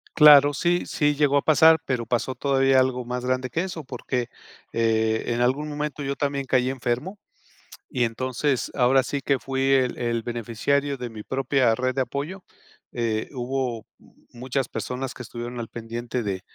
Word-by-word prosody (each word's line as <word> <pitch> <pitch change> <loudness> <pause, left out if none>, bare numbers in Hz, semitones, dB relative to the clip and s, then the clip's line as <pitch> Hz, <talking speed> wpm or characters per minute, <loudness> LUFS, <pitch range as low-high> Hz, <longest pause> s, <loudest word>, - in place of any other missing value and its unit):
Claro, 145 -2 +8
sí, 175 +5 +1
sí 145 -2 +1
llegó 145 -1 +3
a - - +3
pasar, 160 +2 +6
pero 125 -3 -1
pasó 125 +2 -1
todavía 135 0 +3
algo 125 -1 -1
más 125 +1 -4
grande 130 0 -1
que 165 +8 -1
eso, 170 -5 -6
porque, 125 -1 -3 0.5
eh, 110 -1 +1
en 120 0 -1
algún 135 +5 +1
momento 150 0 -4
yo 140 0 -2
también 140 -1 -1
caí 130 -1 +2
enfermo 130 - -3 0.7
y 125 -2 +1
entonces, 130 +3 -1
ahora 130 +1 +3
sí 140 +1 -3
que, 140 0 +1
fui 135 0 -3
el 130 -2 +2
el 115 -1 -1
beneficiario 120 +5 -1
de 125 -1 -5
mi 110 -1 -8
propia 130 -2 +1
red 130 +2 -1
de 135 - 0
apoyo, 150 +9 -4 0.5
eh, 115 -2 -2
hubo 125 -3 -3
m - - -22 0.2
muchas 130 +1 -2
personas 125 +5 -4
que - - -10
estuvieron 120 0 -7
al 115 - -4
pendiente 120 +2 -5
de 95 -3 -3
130 Hz, 175 wpm, -24 LUFS, 120-140 Hz, 0.7 s, Claro